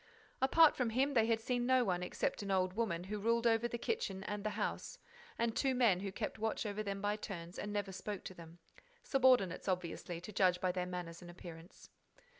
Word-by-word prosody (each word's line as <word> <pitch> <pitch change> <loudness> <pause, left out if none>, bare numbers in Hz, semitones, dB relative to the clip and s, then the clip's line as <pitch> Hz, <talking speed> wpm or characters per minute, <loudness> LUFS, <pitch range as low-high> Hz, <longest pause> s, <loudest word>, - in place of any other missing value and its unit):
Apart 310 +4 +6
from 250 -3 0
him, 265 +5 +1
they 225 -3 +4
had 225 -1 +2
seen 245 +1 -1
no 260 -1 +5
one 180 -3 0
except 180 - -2
an 200 - -5
old 185 -1 +2
woman, 195 -6 -1
who 205 +3 -4
ruled 230 +3 +1
over 230 0 +3
the 235 - -4
kitchen 230 - -2
and 205 +1 -4
the 215 - 0
house, - - -3 0.4
and 230 -1 0
two 265 -2 +2
men, 230 -8 +4
who 195 0 -4
kept 205 - -4
watch 220 +1 -1
over 210 0 -2
them 200 -1 -4
by 205 0 +1
turns 175 -5 -7
and 205 - -4
never 205 -1 -2
spoke 200 +1 -5
to - - -7
them: 170 -1 -12 0.5
subordinates, 250 -11 +3
obviously, 175 -2 -2
to 180 - -9
judge 180 -2 +3
by 185 0 +1
their 180 0 -2
manners 175 -2 -6
and 175 - -10
appearance. 170 -1 -11
205 Hz, 215 wpm, -36 LUFS, 180-230 Hz, 0.5 s, Apart